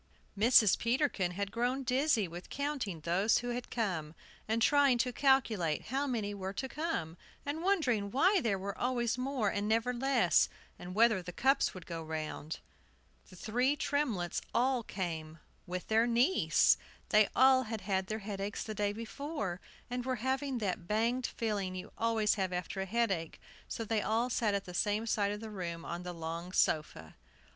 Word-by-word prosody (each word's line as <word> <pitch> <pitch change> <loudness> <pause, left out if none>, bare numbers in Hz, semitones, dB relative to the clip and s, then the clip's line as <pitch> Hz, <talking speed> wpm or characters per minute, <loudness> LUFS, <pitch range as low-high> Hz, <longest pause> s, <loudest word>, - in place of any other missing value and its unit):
Mrs. 215 -1 +5
Peterkin 235 - +1
had 200 +1 -3
grown 245 +4 0
dizzy 255 -4 +2
with 175 +2 -9
counting 275 - -3
those 185 +7 +2
who 245 - -3
had 245 0 -4
come, 170 -9 -2 0.3
and 220 +1 +1
trying 280 +1 +4
to 245 +1 0
calculate 230 - +2
how 275 +3 0
many 215 -6 -2
were 190 -1 -5
to 265 +6 -3
come, 270 - -3 0.3
and 290 +3 -3
wondering 275 - +1
why 365 - +3
there 215 -6 +1
were 195 +1 -5
always 240 -2 0
more 255 -5 0
and 205 +1 -2
never 225 +3 +1
less, 240 - +3 0.3
and 180 +1 -7
whether 220 -3 +4
the 180 0 -7
cups 270 +5 +2
would 180 -2 -9
go 165 -1 -5
round. 155 -1 -5 0.7
The - - -13
three 250 +9 0
Tremletts 260 - -1
all 255 +1 +2
came, 165 -7 -5 0.3
with 180 0 -4
their 225 +2 +3
niece. 245 +10 +4 0.3
They 215 -1 +5
all 260 0 +6
had 220 -1 -4
had 190 -1 -1
their 215 - -2
headaches 200 0 -3
the 215 - -5
day 205 -1 0
before, 230 - -4 0.3
and 245 0 -3
were 260 0 -1
having 265 0 0
that 185 -5 -3
banged 235 +5 +1
feeling 205 -5 -2
you 185 - -7
always 225 -2 +2
have 190 -1 0
after 180 +2 -3
a 190 - -3
headache; 195 -7 -1 0.3
so 230 - -4
they 220 0 0
all 230 +4 0
sat 215 -3 +1
at 200 - -2
the 180 - -8
same 210 +4 0
side 205 -3 +1
of 210 +1 -5
the 220 -1 -7
room 170 -4 -5
on 170 +1 -4
the 180 0 -5
long 170 +1 -6
sofa. 115 - 0
215 Hz, 175 wpm, -32 LUFS, 185-250 Hz, 0.7 s, all